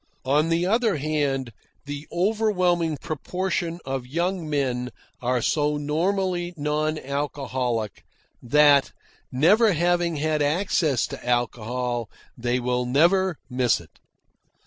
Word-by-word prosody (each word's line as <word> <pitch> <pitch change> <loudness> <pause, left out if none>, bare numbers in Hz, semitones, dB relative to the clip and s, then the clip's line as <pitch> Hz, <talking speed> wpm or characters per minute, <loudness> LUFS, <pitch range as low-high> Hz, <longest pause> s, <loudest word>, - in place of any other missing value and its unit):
On 150 +4 +2
the 170 +1 +1
other 220 -2 +2
hand, 140 -4 -1 0.3
the 145 +1 -6
overwhelming 180 -5 +1
proportion 170 +3 -3
of 130 -2 -3
young 170 +3 -2
men 125 -4 -1 0.3
are 125 -1 0
so 150 -1 +1
normally 175 +4 -1
non 150 +1 0
alcoholic, 130 - -3 0.4
that, 145 +2 +4 0.4
never 200 - +4
having 175 0 +1
had 155 0 0
access 155 - +1
to - - -8
alcohol, 120 0 -1 0.3
they 120 +1 -1
will 125 0 -1
never 175 +6 +3
miss 125 -2 +1
it. 85 -2 -18
150 Hz, 110 wpm, -24 LUFS, 125-175 Hz, 0.4 s, that